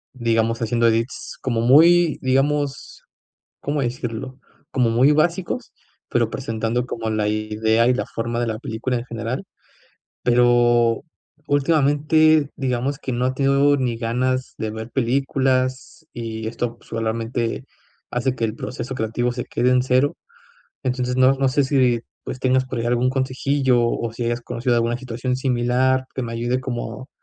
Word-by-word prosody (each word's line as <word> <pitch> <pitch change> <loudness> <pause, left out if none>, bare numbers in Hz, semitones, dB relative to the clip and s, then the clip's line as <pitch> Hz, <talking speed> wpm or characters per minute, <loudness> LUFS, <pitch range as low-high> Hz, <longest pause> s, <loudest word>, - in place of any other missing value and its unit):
digamos, 115 -1 0
haciendo 115 +1 +2
edits 115 +3 -2
como 120 -3 -1
muy, 165 +6 +5
digamos, 140 +2 0 0.6
¿cómo 145 0 -1
decirlo?, 125 +1 -4 0.3
como 125 -3 +2
muy 125 +6 +4
básicos, 170 +4 0 0.4
pero 115 -2 +1
presentando 115 0 -2
como 115 -2 -4
la 105 -1 0
idea 110 +2 +1
y 125 - +4
la - - -2
forma 120 +1 -3
de 120 - 0
la 110 -1 -3
película 120 +2 -3
en 120 - -4
general. 115 +1 -4 0.8
Pero, 120 0 +3 0.4
últimamente, 150 +1 +3
digamos 135 0 -1
que 130 - -4
no 120 +1 0
ha 130 - +1
tenido 140 +1 +3
ni 125 -4 -1
ganas 130 +3 -1
de 110 - -3
ver 110 +2 -7
películas, 130 +2 0
y 110 -2 -5
esto 115 +1 -3
solamente 115 - -3 0.5
hace 125 +1 0
que 115 - -4
el 110 - -4
proceso 125 +2 -5
creativo 120 +2 -1
se 125 0 -5
quede 125 - +1
en 125 0 +4
cero. 130 +2 +1 0.7
Entonces, 125 -1 -1
no 130 +1 +5
no 135 0 +1
sé 135 +2 +2
si, 130 -4 +2 0.2
pues, 130 - -6
tengas 130 0 +2
por 130 -1 -5
llegar 120 +1 -1
algún 125 +1 +2
consejillo, 130 -1 +1
o 115 -1 -2
si 120 +1 -4
hayas 120 +1 -1
conocido 120 +1 -1
alguna 120 0 +1
situación 125 0 -3
similar 130 0 +1
que 130 - -3
me 115 - -5
ayude 120 +2 -1
como 130 0 -5
125 Hz, 155 wpm, -22 LUFS, 115-130 Hz, 0.8 s, muy